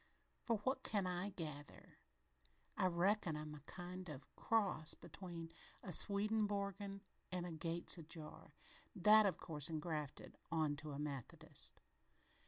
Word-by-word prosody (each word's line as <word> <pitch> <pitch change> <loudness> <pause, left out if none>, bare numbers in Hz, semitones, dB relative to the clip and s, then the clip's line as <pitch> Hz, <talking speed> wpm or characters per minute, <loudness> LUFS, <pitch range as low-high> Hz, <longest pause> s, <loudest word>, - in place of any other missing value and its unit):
From 230 -1 +4
what 265 +3 +2
I - - -3
can 185 -2 0
gather, 150 -4 -7 0.8
I 185 - +3
reckon 180 -1 +2
I'm 150 0 -5
a 150 - -8
kind 180 0 -6
of 140 -3 -6
a - - -21 0.2
cross 195 -8 +3
between 165 -1 -7 0.3
a 185 - -4
Swedenborgian 200 0 +2 0.3
and 180 -1 -1
a 175 - -4
Gates 165 +2 0
ajar 160 -1 -8 0.4
that, 210 +2 +8
of 190 - 0
course, 150 -3 0
engrafted 155 -3 -3
on 155 -3 +2
to 150 -1 -5
a - - -4
Methodist. 135 - -4
175 Hz, 135 wpm, -41 LUFS, 155-200 Hz, 0.8 s, that